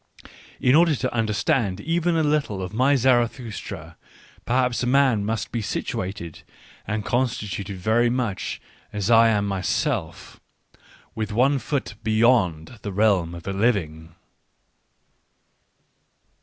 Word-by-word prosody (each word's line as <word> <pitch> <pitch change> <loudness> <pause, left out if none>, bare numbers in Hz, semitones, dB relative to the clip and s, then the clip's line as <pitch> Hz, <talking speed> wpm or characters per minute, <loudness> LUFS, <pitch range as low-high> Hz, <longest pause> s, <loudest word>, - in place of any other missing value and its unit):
In 125 - +3
order 165 0 +5
to 130 0 -3
understand 110 - 0
even 170 +6 0
a 160 - +2
little 140 -11 0
ofmyZarathustra, 120 - 0 0.5
perhaps 125 0 +1
a 125 - -1
man 130 -5 +3
must 110 0 -3
be 115 - -2
situated 95 -4 -4 0.5
and 105 0 -2
constituted 105 -6 -2
very 110 +6 +2
much 120 -6 -2 0.3
as 105 +2 -1
I 115 0 +7
am 105 -2 +1
my 95 -2 -2
self 95 - -2 0.4
— - - -27
with 110 -1 -4
one 135 +6 +2
foot 130 -2 -3
beyond 110 -5 +2
the 100 - -5
realm 95 -4 +2
of 85 - -9
the 100 - -4
living. 85 -7 -1
110 Hz, 120 wpm, -23 LUFS, 100-125 Hz, 0.5 s, I